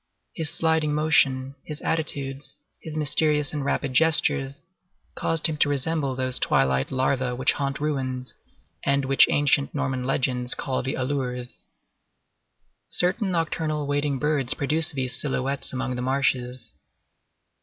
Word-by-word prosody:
His 160 -2 -2
sliding 160 -2 +1
motion, 135 -3 +2
his 150 -1 -7
attitudes, 140 -3 -2 0.2
his 155 -1 -7
mysterious 150 0 +1
and 145 -2 -2
rapid 140 -1 -1
gestures, 140 -2 +3 0.5
caused 165 -1 0
him 160 -2 +4
to 145 - +3
resemble 140 -1 0
those 130 0 -1
twilight 65 0 +2
larvæ 130 -1 0
which 130 - +2
haunt 140 -1 -2
ruins, 130 -4 -2 0.5
and 140 0 +1
which 135 0 +5
ancient 145 0 +2
Norman 135 -3 -1
legends 125 -1 0
call 130 - -2
the 130 - -3
Alleurs. 130 -2 -2 1.3
Certain 190 +3 +1
nocturnal 160 -3 -1
wading 145 0 0
birds 145 -2 0
produce 155 +3 0
these 130 -4 -1
silhouettes 135 -1 -1
among 130 0 -3
the 125 - -3
marshes. 125 -2 -1
140 Hz, 130 wpm, -25 LUFS, 130-150 Hz, 1.3 s, which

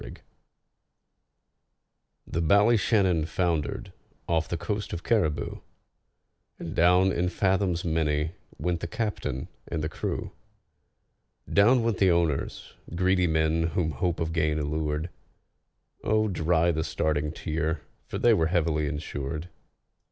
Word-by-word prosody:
THE 80 - -2
Ballyshannon 100 -2 +3
foundered 85 -5 -1 0.3
off 80 -1 +1
the 85 - -1
coast 100 +5 -3
of 85 - -5
Cariboo, 85 -10 0 1.0
And 80 - -6
down 90 +2 +5
in 90 0 0
fathoms 95 -2 +1
many 80 -1 0 0.3
went 85 +1 -1
the - - -4
captain 105 - -3 0.2
and 80 -2 -3
the 75 - -1
crew; - - -4 1.2
Down 115 +5 +4
went 115 -4 0
the 95 - +5
owners—greedy 85 +2 0
men 80 0 +2
whom 80 -3 +1
hope 85 +5 -1
of 80 0 -2
gain 80 -2 +1
allured: 75 +2 -2 0.9
Oh, 110 +1 +2
dry 85 -2 +2
the 80 -1 -1
starting 75 -1 -1
tear, 80 0 -2 0.3
for - - -4
they 120 - +5
were 80 -6 +2
heavily 80 -3 +1
insured. 75 +2 -4
85 Hz, 115 wpm, -27 LUFS, 80-95 Hz, 1.2 s, down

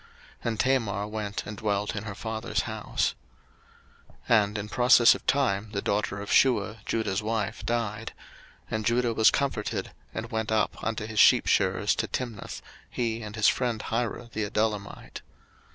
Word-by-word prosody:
And 115 -2 -2
Tamar 115 -7 +1
went 105 -1 -4
and 105 - -6
dwelt 105 0 -1
in 105 +1 -4
her 100 -3 -6
father's 110 +2 -2
house. 110 -2 -2 1.2
01:038:012 110 -3 +7
And 100 +1 -4
in 105 0 -4
process 120 +1 +6
of - - -8
time 110 -7 +1
the 100 - -1
daughter 100 -1 -1
of 100 - -6
Shuah 110 -4 +3
Judah's 105 -3 0
wife 110 -2 -2
died; 115 -2 -2 0.6
and 110 0 -1
Judah 120 +1 +1
was 110 0 +6
comforted, 135 -7 -2 0.2
and 115 +2 -6
went 110 -1 -2
up 110 -2 0
unto 110 -1 -2
his 110 -1 -3
sheepshearers - - +4
to - - -1
Timnath, 120 -5 -5 0.3
he 115 -2 -2
and 105 -1 -7
his 110 -3 +3
friend 120 -3 +1
Hirah 115 +1 -3
the 110 - -1
Adullamite. 105 -2 -2
110 Hz, 155 wpm, -27 LUFS, 105-115 Hz, 1.2 s, 01:038:012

